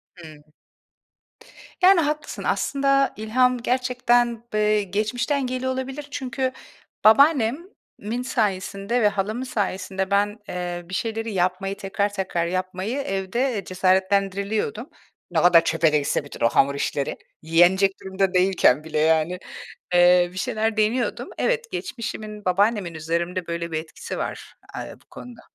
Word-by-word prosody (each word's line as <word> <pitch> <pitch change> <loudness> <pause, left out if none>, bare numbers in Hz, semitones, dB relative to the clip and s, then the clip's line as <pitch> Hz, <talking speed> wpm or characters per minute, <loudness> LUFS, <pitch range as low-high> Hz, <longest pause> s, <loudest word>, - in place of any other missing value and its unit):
Hıı. 155 -4 -13 1.4
Yani, 370 0 +7
haklısın, 300 0 -3
aslında 275 -1 +1
ilham 250 +4 +2
gerçekten 245 -1 +1
b 215 - +1
eee 210 0 +2
geçmişten 235 +8 -1
geliyor 255 +1 -2
olabilir. 270 +3 -5
Çünkü 260 -1 -2 0.5
babaannemin 250 - +2
sayesinde 210 -1 -1
ve 210 - +5
halamın 205 +4 -2
sayesinde 190 -4 -3
ben, 205 +1 +1
eee, 175 -1 -4
bir - - -9
şeyleri 225 +2 -2
yapmayı, 185 +2 -1
tekrar 200 +1 -2
tekrar 190 -4 -1
yapmayı 185 +6 -3
evde 205 +1 -1
cesaretlendiriliyordum. 195 - 0 0.4
Ne - - +2
kadar 175 -2 +6
çöpe 165 -1 +2
de - - +5
gitse 145 0 -1
bütün 140 - -3
o - - +5
hamur 140 +3 +3
işleri. 140 0 -2 0.2
Yenecek 175 +5 +4
durumda 190 0 -1
değilken 180 -7 +3
bile 155 -1 -2
yani, 160 +3 +2 0.5
eee 175 0 +5
bir 185 - -11
şeyler 220 +2 -1
deniyordum. 220 +4 0
Evet, 475 -1 -1
geçmişimin, 215 -3 -6
babaannemin 200 -1 +1
üzerimde 170 +3 -3
böyle 170 0 -4
bir 155 - -1
etkisi 160 0 -7
var, - - -5 0.2
eee, - - -6
bu - - -27
konuda. 245 -2 -11
200 Hz, 130 wpm, -23 LUFS, 180-240 Hz, 1.4 s, Yani